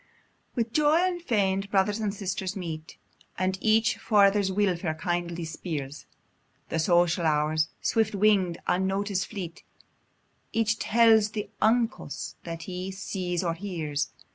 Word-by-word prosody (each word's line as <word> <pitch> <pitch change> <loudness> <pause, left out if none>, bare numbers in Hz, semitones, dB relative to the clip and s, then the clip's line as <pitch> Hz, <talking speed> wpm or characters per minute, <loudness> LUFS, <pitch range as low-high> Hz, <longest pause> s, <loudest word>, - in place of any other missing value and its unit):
With 230 -1 -1
joy 305 +1 +4
unfeign'd, 220 - 0
brothers 205 +2 +2
and 210 -2 0
sisters 195 -1 -3
meet, 160 -4 -6 0.4
And 185 0 0
each 220 0 +3
for 210 -3 +4
other's 200 0 +2
weelfare 185 -5 0
kindly 175 0 -2
speirs: 150 -4 -5 0.6
The 165 - -1
social 175 +1 +3
hours, 155 0 +2
swift 220 -2 +1
wing'd, 195 -4 +3
unnotic'd 190 +2 0
fleet: 180 -5 -7 0.9
Each 225 -1 +1
tells 225 -2 +5
the 210 -1 -4
uncos 230 - 0
that 165 -1 -5
he 185 0 -5
sees 185 -2 -3
or 170 -2 0
hears. 165 -6 -3
190 Hz, 125 wpm, -27 LUFS, 170-215 Hz, 0.9 s, tells